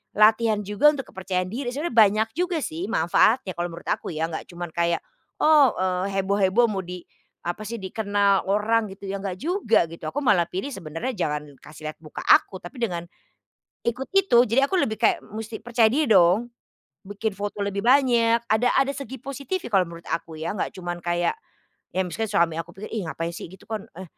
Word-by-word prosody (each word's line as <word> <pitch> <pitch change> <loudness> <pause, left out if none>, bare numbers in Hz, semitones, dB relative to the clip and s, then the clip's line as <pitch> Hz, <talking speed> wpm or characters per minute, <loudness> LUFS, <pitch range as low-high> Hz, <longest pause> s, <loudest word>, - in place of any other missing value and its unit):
latihan 215 0 +4
juga 210 +10 +4
untuk 275 -3 -6
kepercayaan 185 -1 -2
diri, 245 +2 -3
sebenarnya 290 -1 -3
banyak 215 0 +5
juga 355 -1 0
sih 170 +5 -4
mafaatnya 195 +4 +3
kalau 175 0 -2
menurut 170 - -11
aku - - -2
ya 160 +1 -1
nggak 160 - -5
cuman 175 0 -6
kayak, 170 0 +1 0.4
oh, 295 -6 +6
eee, 185 +1 0
heboh-heboh 200 +4 +3
mau 195 -3 -2
di, 180 +1 -7 0.5
apa 175 +5 -3
sih, 230 - -4
dikenal 200 0 +1
orang 215 +3 +2
gitu 195 0 -10
ya 200 - -2
nggak 185 -2 -3
juga 305 - +2
gitu. 165 - -11
Aku 285 - -2
malah 205 -9 +4
pilih 190 +9 -3
sebenarnya 190 - -5
jangan 150 -4 -1 0.2
kasih 155 0 -9
lihat - - -9
muka 155 - -8
aku, 190 - +5
tapi 175 - -11
dengan, 175 -5 -2 0.8
ikut 245 +3 -2
itu, 255 -11 +5
jadi 270 +5 +2
aku 380 - +2
lebih 220 -10 +1
kayak 220 +1 +2
musti 220 +1 -7
percaya 230 -1 +2
dia 300 +4 +1
dong. 195 +2 +5 0.6
Bikin 205 +1 -4
foto 205 0 -4
lebih 200 +1 -2
banyak 240 -3 +4
ada 225 +3 +3
ada 270 0 +3
segi 265 -3 -7
positifnya 275 +6 -4
kalau 195 -4 +3
menurut 170 0 -11
aku 160 -1 -4
ya, 170 +6 -3
nggak - - -2
cuman 175 -1 -6
kayak, 175 - 0 0.6
ya - - +3
misalkan 220 +5 -3
suami 170 -5 +1
aku 170 +2 -10
pikir, 205 +2 -8
"Ih 200 -7 -3
ngapain 165 +1 -3
sih 170 - -8
gitu 190 +2 -15
kan, 220 -3 -6
eh 185 - -7
205 Hz, 195 wpm, -24 LUFS, 175-235 Hz, 0.8 s, oh